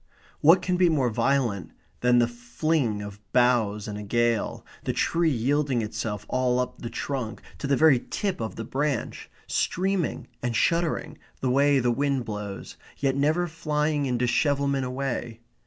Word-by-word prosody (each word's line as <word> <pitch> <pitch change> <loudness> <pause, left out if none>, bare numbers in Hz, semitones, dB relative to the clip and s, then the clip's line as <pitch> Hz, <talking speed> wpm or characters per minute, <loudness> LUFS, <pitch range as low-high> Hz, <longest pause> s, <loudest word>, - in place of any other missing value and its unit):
What 170 +5 +6
can 180 -1 +1
be 180 -1 +4
more 135 -7 +2
violent 115 -4 0 0.3
than 125 0 +4
the 120 -1 +4
fling 120 -1 -1
of 100 0 -8
boughs 120 -5 +2
in 105 -1 -5
a 105 - -6
gale, 120 +1 0 0.2
the - - -1
tree 170 -1 +2
yielding 135 -1 +1
itself 105 -1 -4
all 125 -1 +1
up 125 - -3
the 120 - -4
trunk, 125 -1 -4 0.2
to 140 - -3
the 140 -1 +2
very 155 -4 +6
tip 195 - -2
of 110 - -4
the 115 - -5
branch, 140 0 -2 0.2
streaming 190 -2 -1 0.2
and 120 -1 -2
shuddering 170 +3 0 0.2
the 130 - 0
way 140 +2 +4
the 125 -2 +2
wind 135 0 0
blows, 105 -2 -6 0.2
yet 135 -1 +1
never 155 +5 +2
flying 150 -3 -1
in 125 -1 0
dishevelment 140 +2 +1
away? 125 -3 -3
130 Hz, 160 wpm, -26 LUFS, 115-150 Hz, 0.3 s, What